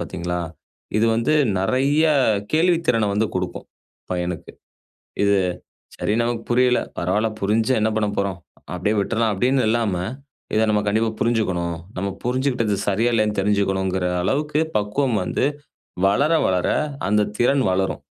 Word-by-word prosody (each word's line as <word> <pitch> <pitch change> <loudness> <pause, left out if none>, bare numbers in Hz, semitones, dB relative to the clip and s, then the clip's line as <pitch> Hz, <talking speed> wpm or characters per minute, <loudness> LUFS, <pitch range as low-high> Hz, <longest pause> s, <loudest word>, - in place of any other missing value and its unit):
பாத்தீங்களா? 90 +1 -3 0.6
இது 115 +2 +3
வந்து 115 +6 +1 0.3
நெறைய 135 +9 +2 0.5
கேள்வித்திறனை 160 - +2
வந்து 105 +2 +1
குடுக்கும் 90 -1 -4 0.4
பையனுக்கு. 90 -1 -3 0.7
"இது, 100 0 +4 0.6
சரி 105 - -1
நமக்கு 115 -1 -2
புரியல, 125 0 +3 0.2
பரவால்ல! 105 +6 +1
புரிஞ்சு 110 +5 +1
என்ன 110 - +2
பண்ண 105 -1 +1
போறோம்? 100 -2 -1 0.4
அப்டீயே 105 +4 0
விட்டுட்லாம்" 110 +1 0
அப்டீன்னு 130 +6 +2
இல்லாம 110 -5 +1 0.6
இதை 110 - +3
நம்ம 105 -1 +2
கண்டிப்பா 110 +2 +1
புரிஞ்சுக்கணும், 95 -8 0 0.2
நாம 100 +1 -2
புரிஞ்சுகிட்டது 125 -4 0
சரியா, 110 +5 +2
இல்லயான்னு 110 -2 +1
தெரிஞ்சுக்கணுங்குற 95 -2 0 0.2
அளவுக்கு 150 - 0 0.2
பக்குவம் 110 +4 0
வந்து - - -1 0.6
வளர 140 +11 +2
வளர 90 -1 +1 0.4
அந்த 105 0 +3 0.2
திறன் 130 +2 +3
வளரும். 95 +1 -1
110 Hz, 125 wpm, -22 LUFS, 95-125 Hz, 0.7 s, இது